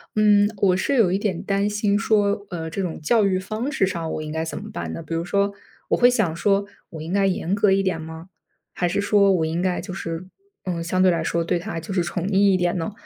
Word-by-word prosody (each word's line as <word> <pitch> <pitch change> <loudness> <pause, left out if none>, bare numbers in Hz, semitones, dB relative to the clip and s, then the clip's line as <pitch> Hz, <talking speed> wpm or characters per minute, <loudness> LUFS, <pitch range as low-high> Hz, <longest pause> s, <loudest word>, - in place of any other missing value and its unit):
嗯， 205 -1 +5
我 190 -2 +3
是 275 +9 0
有 220 -8 +4
一 190 - +2
点 195 -4 -2
担 200 0 0
心 210 -1 +1
说 205 -2 +1
呃， 165 -2 -4
这 190 +4 -3
种 170 -4 -5
教 220 +6 +3
育 190 -1 +1
方 215 +8 -4
式 195 -9 +1
上， 165 -3 -3
我 - - -3
应 155 0 -6
该 160 +1 -2
怎 160 - -5
么 - - -9
办 85 -2 -5
呢？ - - -6
比 165 +1 -5
如 165 +1 -2
说 200 +1 +1 0.4
我 - - +2
会 245 - +6
想 215 -10 +1
说， 200 +3 +1 0.2
我 160 - -8
应 160 +2 -6
该 200 0 +2
严 185 -1 0
格 205 -1 +3
一 195 0 +3
点 185 -4 -1
吗？ 160 +2 -9 0.4
还 175 - 0
是 200 - 0
说， 200 -1 +4
我 175 -4 +2
应 160 +2 -2
该 180 0 0
就 195 - -8
是 165 -1 -5 0.4
嗯， 175 -3 -2
相 185 +2 0
对 185 - +6
来 165 -2 +1
说， 170 +1 0
对 175 - 0
他 170 -1 -5
就 185 +6 -8
是 180 - +2
宠 175 +2 -3
溺 205 - -2 0.2
一 - - +3
点 175 0 0
呢？ 170 +5 -3
185 Hz, 280 characters per minute, -23 LUFS, 165-200 Hz, 0.4 s, 会